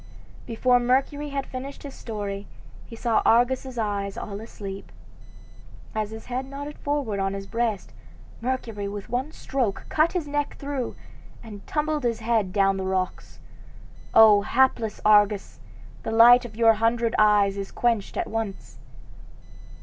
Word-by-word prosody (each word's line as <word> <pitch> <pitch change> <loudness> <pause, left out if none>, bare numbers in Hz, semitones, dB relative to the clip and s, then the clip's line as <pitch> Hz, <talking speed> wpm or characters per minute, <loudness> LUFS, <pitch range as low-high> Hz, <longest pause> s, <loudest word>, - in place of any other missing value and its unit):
Before 245 +2 +3
Mercury 270 +4 0
had 275 -1 -3
finished 265 +2 -8
his 280 -2 -8
story 205 -3 -5 0.4
he 230 - -10
saw 230 0 +1
Argus's 250 +2 +2
eyes 200 -3 -2
all 205 0 -6
asleep. 200 -3 -8 1.0
As 215 -2 -2
his 220 0 -9
head 255 +1 -4
nodded 285 +2 -7
forward 285 -9 -2
on 195 0 -1
his 195 0 -6
breast, 225 -1 -2 0.5
Mercury 230 -5 -3
with 200 0 -7
one 255 +5 -2
stroke 250 -10 -2
cut 315 +2 +2
his 345 -5 -2
neck 290 0 -2
through, 275 -3 -4 0.5
and 205 -3 -11
tumbled 300 0 -1
his 230 -2 -1
head 220 -4 +1
down 195 0 +2
the 190 - -3
rocks. 190 -1 -3 0.8
O 215 -2 +8
hapless 235 -1 +1
Argus! 205 -1 +3 0.4
the - - -5
light 240 +2 +7
of 220 -3 -9
your 225 0 +5
hundred 230 +1 +1
eyes 205 -2 +4
is 195 -1 -5
quenched 230 -4 -1
at - - 0
once! 220 -3 -5
225 Hz, 145 wpm, -25 LUFS, 205-260 Hz, 1.0 s, O